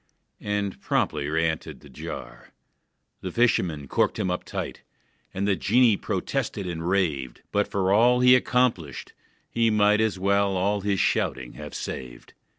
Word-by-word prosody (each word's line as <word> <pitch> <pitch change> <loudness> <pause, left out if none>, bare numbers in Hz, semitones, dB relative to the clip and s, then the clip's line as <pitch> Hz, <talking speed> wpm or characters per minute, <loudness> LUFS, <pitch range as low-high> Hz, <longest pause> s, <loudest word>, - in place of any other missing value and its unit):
And 105 -1 -2
promptly 75 -2 0
reëntered 80 -3 -2
the 75 - -14
jar. 65 - -9 0.7
The - - -5
fisherman 85 - +1
corked - - +1
him 90 - -1
up 90 - -3
tight: - - -5 0.5
The 100 +1 0
genie 115 +3 +4
protested 95 - -3
and 85 -1 -3
raved, 75 -10 -1
But 105 0 +1
for 95 -1 +1
all 120 +4 +5
he 125 0 +7
accomplished, 115 - 0 0.3
he 115 -1 +1
might 105 0 +3
As 110 -4 0
well 100 0 +1
all 100 +2 0
his 100 -1 0
shouting 65 -2 0
have 75 -1 -9
saved. - - -7
95 Hz, 145 wpm, -25 LUFS, 80-105 Hz, 0.7 s, he